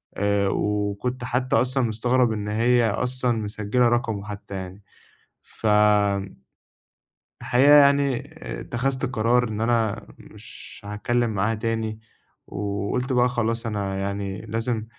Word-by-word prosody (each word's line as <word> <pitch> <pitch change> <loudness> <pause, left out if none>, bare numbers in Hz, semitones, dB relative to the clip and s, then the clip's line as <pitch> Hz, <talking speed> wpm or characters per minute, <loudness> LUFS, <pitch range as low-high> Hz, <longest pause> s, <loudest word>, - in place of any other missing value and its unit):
آآ، 100 0 +1
وكُنت 105 +6 -2
حتّى 125 +1 0
أصلًا 130 +3 +2
مستغرب 120 +2 +1
إن 105 -1 -4
هي 115 +2 +2
أصلًا 125 +3 +1
مسجلة 105 +4 0
رقمه 115 -4 -1
حتّى 100 -1 -8
يعني 95 +1 -8 0.6
فآمم، 105 -2 +1 1.1
الحقيقة 135 +4 +4
يعني 140 -2 +3 0.3
اتخذت 130 +2 -2
قرار 120 0 +1
إن 105 0 -4
أنا 115 -2 0
مش - - -12
هاتكلّم 115 +3 -1
معاها 105 +3 0
تاني، 110 0 -3 0.5
وقُلت 105 +6 -3
بقى 125 0 +3
خلاص 115 -1 -2
أنا 100 -3 -3
يعني 100 0 -4
لازم 115 0 -3
110 Hz, 115 wpm, -24 LUFS, 105-125 Hz, 1.1 s, الحقيقة